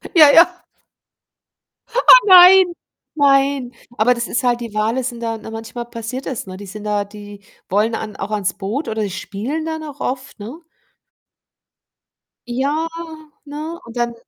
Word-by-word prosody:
Ja, 300 Hz, -3 st, +8 dB
ja. 350 Hz, +3 st, +5 dB, 1.4 s
Oh, -, -, +1 dB, 0.3 s
nein, 370 Hz, +1 st, +9 dB, 0.5 s
nein. 275 Hz, -3 st, +2 dB, 0.2 s
Aber 235 Hz, +4 st, +3 dB
das 235 Hz, 0 st, -4 dB
ist 250 Hz, -, -2 dB
halt 240 Hz, -1 st, +1 dB
die 230 Hz, -3 st, -7 dB
Wale 225 Hz, +4 st, -1 dB
sind 240 Hz, -2 st, -5 dB
da 225 Hz, -1 st, -3 dB
ne, 220 Hz, -, -10 dB
manchmal 225 Hz, +2 st, -7 dB
passiert 235 Hz, +3 st, -7 dB
das, 245 Hz, -7 st, -5 dB
ne? 185 Hz, 0 st, -8 dB
Die 200 Hz, -, -10 dB
sind 210 Hz, +2 st, -9 dB
da 205 Hz, -1 st, -1 dB
die 205 Hz, 0 st, -12 dB, 0.3 s
wollen 215 Hz, +4 st, +1 dB
an 215 Hz, -2 st, -6 dB
auch 200 Hz, +2 st, -6 dB
ans 195 Hz, -4 st, -1 dB
Boot, 210 Hz, +10 st, -4 dB
oder 220 Hz, -1 st, -2 dB
die 200 Hz, -, -4 dB
spielen 215 Hz, +12 st, -5 dB
dann 320 Hz, -1 st, -5 dB
auch 290 Hz, -2 st, -10 dB
oft, 260 Hz, -2 st, -5 dB
ne? 250 Hz, +12 st, -9 dB, 1.9 s
Ja, 285 Hz, +6 st, -1 dB, 0.6 s
ne? 310 Hz, +4 st, -7 dB
Und 230 Hz, +1 st, -11 dB
dann 240 Hz, 0 st, -1 dB
240 Hz, 160 wpm, -18 LUFS, 215-285 Hz, 1.9 s, nein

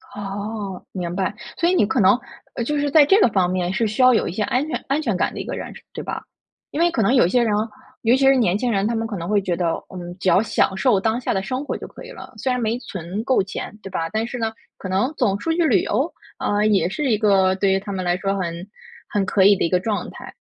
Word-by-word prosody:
哦， 200 Hz, -1 st, -5 dB
明 175 Hz, -2 st, -4 dB
白。 195 Hz, +1 st, -1 dB, 0.2 s
所 340 Hz, -, +2 dB
以 370 Hz, -, +2 dB
你 280 Hz, -, +4 dB
可 230 Hz, +4 st, 0 dB
能， 190 Hz, +4 st, +5 dB, 0.4 s
呃， 235 Hz, -, -2 dB
就 295 Hz, +5 st, -1 dB
是 285 Hz, 0 st, 0 dB
在 295 Hz, 0 st, +6 dB
这 390 Hz, +7 st, +5 dB
个 425 Hz, -, +6 dB
方 185 Hz, -3 st, +1 dB
面 180 Hz, -1 st, -1 dB
是 225 Hz, +2 st, +1 dB
需 215 Hz, +5 st, -1 dB
要 255 Hz, 0 st, +7 dB
有 225 Hz, -, +1 dB
一 -, -, -3 dB
些 205 Hz, -, -3 dB
安 260 Hz, +8 st, 0 dB
全 -, -, -4 dB
安 285 Hz, +3 st, +1 dB
全 225 Hz, -10 st, -1 dB
感 -, -, 0 dB
的 -, -, -6 dB
一 -, -, -4 dB
个 -, -, -4 dB
人， -, -, -6 dB
是 -, -, -13 dB
对 -, -, -6 dB
吧？ -, -, -5 dB, 0.5 s
因 300 Hz, -, -4 dB
为 345 Hz, +1 st, +4 dB
可 230 Hz, -, 0 dB
能 220 Hz, +5 st, +3 dB
有 250 Hz, -, +5 dB
一 175 Hz, -, +1 dB
些 245 Hz, +2 st, +3 dB
人， 215 Hz, -2 st, +1 dB, 0.5 s
尤 235 Hz, +2 st, +4 dB
其 270 Hz, -, +2 dB
是 270 Hz, 0 st, +6 dB
年 205 Hz, -7 st, +2 dB
轻 245 Hz, +1 st, -1 dB
人， 200 Hz, 0 st, +1 dB
他 230 Hz, -, -1 dB
们 225 Hz, 0 st, -1 dB
可 205 Hz, -4 st, -5 dB
能 170 Hz, 0 st, -5 dB
会 205 Hz, 0 st, +2 dB
觉 185 Hz, -3 st, -1 dB
得： 175 Hz, -1 st, 0 dB, 0.3 s
嗯， 175 Hz, -1 st, -7 dB
只 185 Hz, -, +1 dB
要 190 Hz, -, +5 dB
享 205 Hz, -3 st, +1 dB
受 230 Hz, -4 st, +3 dB
当 220 Hz, +3 st, 0 dB
下 250 Hz, -, -1 dB
的 190 Hz, -, 0 dB
生 255 Hz, +6 st, -3 dB
活 -, -, -3 dB
就 -, -, -8 dB
可 -, -, -12 dB
以 -, -, -10 dB
了， -, -, -11 dB
虽 260 Hz, -, -1 dB
然 250 Hz, -, 0 dB
没 225 Hz, +2 st, 0 dB
存 190 Hz, 0 st, -5 dB
够 260 Hz, -3 st, +3 dB
钱 210 Hz, +1 st, -7 dB
对 195 Hz, -, -7 dB
吧？ 165 Hz, -3 st, -2 dB
但 220 Hz, +1 st, -1 dB
是 245 Hz, +1 st, -5 dB
呢， 225 Hz, -1 st, -1 dB, 0.3 s
可 190 Hz, -, -7 dB
能 205 Hz, +10 st, 0 dB
总 200 Hz, -6 st, +1 dB
出 325 Hz, -, -2 dB
去 335 Hz, 0 st, +2 dB
旅 210 Hz, -, +4 dB
游， 265 Hz, +10 st, 0 dB, 0.3 s
啊， 205 Hz, 0 st, 0 dB
也 205 Hz, -4 st, +3 dB
是 270 Hz, +6 st, -2 dB
一 215 Hz, -, +3 dB
个 195 Hz, -3 st, +3 dB
对 195 Hz, 0 st, +1 dB
于 195 Hz, -, +2 dB
他 200 Hz, +1 st, -7 dB
们 190 Hz, -1 st, -3 dB
来 175 Hz, 0 st, +1 dB
说 195 Hz, +1 st, -1 dB
很 170 Hz, 0 st, -4 dB, 0.4 s
很 200 Hz, -2 st, 0 dB
可 195 Hz, -1 st, +2 dB
以 200 Hz, +1 st, +7 dB
的 -, -, 0 dB
一 -, -, 0 dB
个 180 Hz, +1 st, +2 dB
状 205 Hz, +1 st, -2 dB
态。 -, -, -11 dB
210 Hz, 315 characters per minute, -22 LUFS, 190-245 Hz, 0.5 s, 要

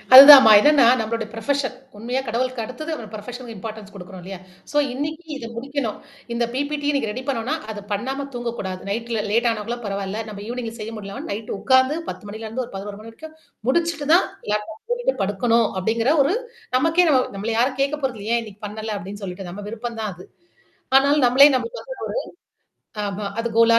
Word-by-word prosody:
அதுதாமா. 270 Hz, -4 st, +12 dB
என்னன்னா, 290 Hz, 0 st, +5 dB
நம்மளுடைய 225 Hz, 0 st, -2 dB
ப்ரொஃபஷன் 260 Hz, +3 st, -1 dB, 0.2 s
உண்மையா 245 Hz, +5 st, -2 dB
கடவுளுக்கு 245 Hz, +1 st, -1 dB
அடுத்தது 310 Hz, +8 st, -7 dB
நமது 225 Hz, -8 st, -7 dB
ப்ரொஃபஷனுக்கு 240 Hz, +2 st, -8 dB
இம்பார்ட்டன்ஸ் 215 Hz, 0 st, -8 dB
குடுக்குறோம் 185 Hz, 0 st, -10 dB
இல்லையா? 190 Hz, -1 st, -8 dB, 0.3 s
சோ 295 Hz, -, -1 dB, 0.2 s
இன்னிக்கு 310 Hz, +5 st, -4 dB
இத 230 Hz, -, -7 dB
முடிக்கணும். 260 Hz, -2 st, -3 dB, 0.4 s
இந்த 235 Hz, 0 st, 0 dB
பிபிடி 290 Hz, +2 st, -2 dB
இன்னைக்கு 275 Hz, -7 st, 0 dB
ரெடி 255 Hz, +5 st, -6 dB
பண்ணோனா, 255 Hz, +3 st, -1 dB, 0.2 s
அதப் 205 Hz, -1 st, -9 dB
பண்ணாம 265 Hz, +7 st, -3 dB
தூங்கக்கூடாது. 230 Hz, -6 st, -4 dB
நைட்ல 230 Hz, +1 st, -2 dB
லேட் 235 Hz, +2 st, +3 dB
ஆனாக்கூட 225 Hz, +2 st, -4 dB
பரவால்ல. 200 Hz, +1 st, -3 dB
நம்ம 205 Hz, -1 st, -8 dB
ஈவ்னிங்ல 235 Hz, -1 st, -4 dB
செய்ய 220 Hz, +2 st, -6 dB
முடியலனா 200 Hz, -1 st, -7 dB
நைட் 215 Hz, +2 st, -5 dB
உக்காந்து, 260 Hz, +3 st, +3 dB
10 -, -, -7 dB
மணில 220 Hz, +2 st, -7 dB
இருந்து 240 Hz, +4 st, -3 dB
ஒரு 235 Hz, -, -15 dB
11 200 Hz, +1 st, -6 dB
மணி 225 Hz, -, -10 dB
வரைக்கும் 315 Hz, +7 st, -12 dB, 0.3 s
முடிச்சுட்டு 330 Hz, 0 st, 0 dB
தான் 360 Hz, -, +6 dB, 0.3 s
லேப்டாப் 210 Hz, +1 st, -3 dB
பூட்டிட்டு -, -, 0 dB
படுக்கணும், 225 Hz, +3 st, +2 dB
அப்படிங்கிற 230 Hz, +7 st, +1 dB
ஒரு 310 Hz, -, +1 dB, 0.4 s
நமக்கே 325 Hz, +5 st, +3 dB
நம்ம 260 Hz, -3 st, +5 dB
நம்மள 210 Hz, +4 st, -3 dB
யாரும் 260 Hz, +2 st, +1 dB
கேட்க 280 Hz, +2 st, +1 dB
போறததுல்ல, 240 Hz, -7 st, -4 dB
"ஏன் 235 Hz, -, +1 dB
இன்னைக்கு 210 Hz, -2 st, -13 dB
பண்ணல?" 215 Hz, +1 st, -5 dB
அப்படின்னு 200 Hz, +2 st, -8 dB
சொல்லிட்டு, 180 Hz, 0 st, -6 dB
நம்ம 205 Hz, +3 st, -8 dB
விருப்பம் 230 Hz, +1 st, -6 dB
தான் 215 Hz, -, -2 dB
அது. 180 Hz, -, -12 dB, 0.7 s
ஆனாலும் 280 Hz, +1 st, +4 dB
நம்மளே 275 Hz, +4 st, +8 dB
நம்மளுக்கு 470 Hz, -, -4 dB
வந்து -, -, -8 dB, 0.8 s
ஒரு -, -, -55 dB, 0.3 s
ஆமா 200 Hz, +1 st, -4 dB
அது 235 Hz, +1 st, 0 dB
கோலா 230 Hz, 0 st, +6 dB
230 Hz, 180 wpm, -22 LUFS, 210-270 Hz, 0.8 s, அதுதாமா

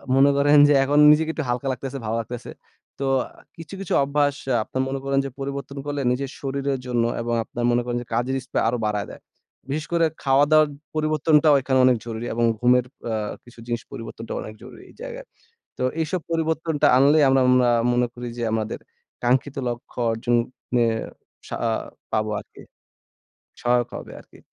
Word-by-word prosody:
মনে 135 Hz, +1 st, +6 dB
করেন 145 Hz, +1 st, +5 dB
যে, 145 Hz, -, +5 dB
এখন 145 Hz, +2 st, +2 dB
নিজেকে 155 Hz, +1 st, +3 dB
একটু 155 Hz, -, -3 dB
হালকা 125 Hz, +3 st, -1 dB
লাগতেছে, 130 Hz, +2 st, -5 dB
ভালো 110 Hz, +1 st, -1 dB
লাগতেছে। 115 Hz, +1 st, -6 dB, 0.5 s
তো 140 Hz, -, -1 dB, 0.2 s
আ -, -, -19 dB, 0.3 s
কিছু, 165 Hz, 0 st, -10 dB
কিছু 195 Hz, -, -3 dB
অভ্যাস 145 Hz, 0 st, +1 dB, 0.2 s
আ -, -, +3 dB
আপনার 130 Hz, -, -3 dB
মনে 135 Hz, 0 st, -3 dB
করেন 135 Hz, 0 st, +1 dB
যে, -, -, -3 dB
পরিবর্তন 140 Hz, +1 st, -5 dB
করলে 145 Hz, -1 st, -2 dB
নিজের 135 Hz, +2 st, -2 dB
শরীরের 140 Hz, 0 st, -2 dB
জন্য 120 Hz, -2 st, +1 dB, 0.2 s
এবং 120 Hz, 0 st, -2 dB
আপনার 120 Hz, +1 st, -4 dB
মনে 120 Hz, 0 st, +2 dB
করেন 120 Hz, 0 st, -2 dB
যে, -, -, -9 dB
কাজের 120 Hz, +3 st, 0 dB
স্পৃহা -, -, -1 dB
আরও 120 Hz, -, -1 dB
বাড়ায় 105 Hz, -1 st, -1 dB
দেয়। -, -, -12 dB, 0.5 s
বিশেষ 150 Hz, +2 st, -2 dB
করে 170 Hz, -1 st, +4 dB, 0.2 s
খাওয়া-দাওয়ার 145 Hz, +3 st, +4 dB, 0.3 s
পরিবর্তনটাও 155 Hz, -1 st, +3 dB
এখানে 130 Hz, 0 st, +1 dB
অনেক 130 Hz, -1 st, +4 dB
জরুরি 115 Hz, 0 st, -5 dB
এবং 120 Hz, +1 st, 0 dB, 0.2 s
ঘুমের 125 Hz, +1 st, +4 dB, 0.3 s
আ -, -, -1 dB, 0.3 s
কিছু 120 Hz, -1 st, -17 dB
জিনিস 120 Hz, -1 st, -2 dB
পরিবর্তনটা 115 Hz, -2 st, -7 dB
অনেক 110 Hz, -, -8 dB
জরুরি -, -, -12 dB
এই -, -, -18 dB
জায়গায়। -, -, -7 dB, 0.5 s
তো -, -, -3 dB, 0.2 s
এইসব 160 Hz, +3 st, -1 dB
পরিবর্তনটা 160 Hz, -1 st, 0 dB
আনলেই 145 Hz, +2 st, +5 dB
আমরা 135 Hz, 0 st, +4 dB
মনা 125 Hz, -1 st, +4 dB, 0.2 s
মনে 120 Hz, 0 st, +2 dB
করি 120 Hz, 0 st, -6 dB
যে, 120 Hz, -, -1 dB
আমাদের 110 Hz, -1 st, -3 dB, 0.4 s
কাঙ্ক্ষিত 130 Hz, +3 st, +1 dB
লক্ষ্য 120 Hz, +1 st, -7 dB
অর্জন 120 Hz, +2 st, -1 dB, 0.4 s
ন্যায়ে 115 Hz, -2 st, +3 dB, 0.5 s
সা -, -, -4 dB, 0.6 s
পাবো 110 Hz, 0 st, 0 dB
আরকি। -, -, -15 dB, 1.0 s
সহায়ক 120 Hz, 0 st, +2 dB
হবে -, -, -9 dB
আরকি। -, -, -18 dB
135 Hz, 175 wpm, -23 LUFS, 120-145 Hz, 1.0 s, মনে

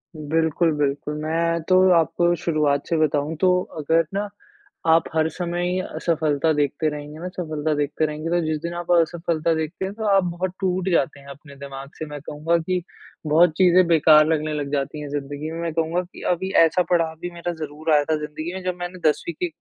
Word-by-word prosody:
बिल्कुल, 160 Hz, +2 st, +1 dB
बिल्कुल। 145 Hz, +1 st, -1 dB
मैं 165 Hz, +1 st, 0 dB
तो 185 Hz, -, +6 dB, 0.2 s
आपको 175 Hz, +3 st, +1 dB
शुरुआत 150 Hz, -4 st, 0 dB
से 165 Hz, -, 0 dB
बताऊँ, 150 Hz, 0 st, 0 dB
तो 180 Hz, -1 st, +4 dB, 0.2 s
अगर 160 Hz, +2 st, +2 dB
ना 205 Hz, +1 st, -1 dB, 0.6 s
आप 165 Hz, +1 st, +5 dB
हर 160 Hz, 0 st, +3 dB
समय 175 Hz, +1 st, -3 dB
ही 185 Hz, +1 st, 0 dB
असफलता 160 Hz, -4 st, 0 dB
देखते 145 Hz, +1 st, 0 dB
रहेंगे 150 Hz, +1 st, -8 dB
ना 180 Hz, -, -5 dB
सफलता 155 Hz, -3 st, -2 dB
देखते 145 Hz, +2 st, 0 dB
रहेंगे, 155 Hz, +1 st, -4 dB
तो 175 Hz, +1 st, +2 dB
जिस 155 Hz, 0 st, 0 dB
दिन 170 Hz, 0 st, -3 dB
आप 175 Hz, 0 st, -4 dB
असफलता 170 Hz, -1 st, +1 dB
देखते 160 Hz, +4 st, -3 dB
हैं 195 Hz, -, -5 dB
तो 220 Hz, 0 st, -4 dB
आप 195 Hz, -, +4 dB
बहुत 180 Hz, +1 st, -2 dB
टूट 185 Hz, 0 st, 0 dB
जाते 170 Hz, -4 st, +1 dB
हैं 140 Hz, -, -16 dB
अपने 140 Hz, +1 st, -12 dB
दिमाग 140 Hz, 0 st, -8 dB
से, 155 Hz, -, -3 dB
मैं 150 Hz, -1 st, -7 dB
कहूँगा 155 Hz, +4 st, -1 dB
कि 180 Hz, +2 st, -1 dB, 0.5 s
बहुत 160 Hz, +3 st, +5 dB
चीजें 185 Hz, -1 st, +5 dB
बेकार 155 Hz, -2 st, +6 dB
लगने 155 Hz, -1 st, 0 dB
लग 145 Hz, -2 st, -3 dB
जाती 145 Hz, +1 st, -2 dB
हैं 145 Hz, -, -6 dB
जिंदगी 145 Hz, +2 st, -4 dB
में। 165 Hz, -, -5 dB
मैं 165 Hz, -1 st, -3 dB
कहूँगा 165 Hz, +2 st, 0 dB
कि 180 Hz, 0 st, -13 dB
अभी 190 Hz, +2 st, -4 dB
ऐसा 180 Hz, +3 st, +1 dB
पड़ाव 165 Hz, -2 st, +2 dB
भी 175 Hz, -, -4 dB
मेरा 175 Hz, 0 st, -4 dB
ज़रूर 155 Hz, +2 st, -4 dB
आया 145 Hz, -1 st, +5 dB
था 160 Hz, -, +1 dB
जिंदगी 155 Hz, +3 st, -6 dB
में 190 Hz, 0 st, -6 dB
जब 180 Hz, -1 st, -2 dB
मैंने 175 Hz, +1 st, -6 dB
10वीं 170 Hz, +3 st, -3 dB
की 180 Hz, -, 0 dB
160 Hz, 205 wpm, -23 LUFS, 150-175 Hz, 0.6 s, तो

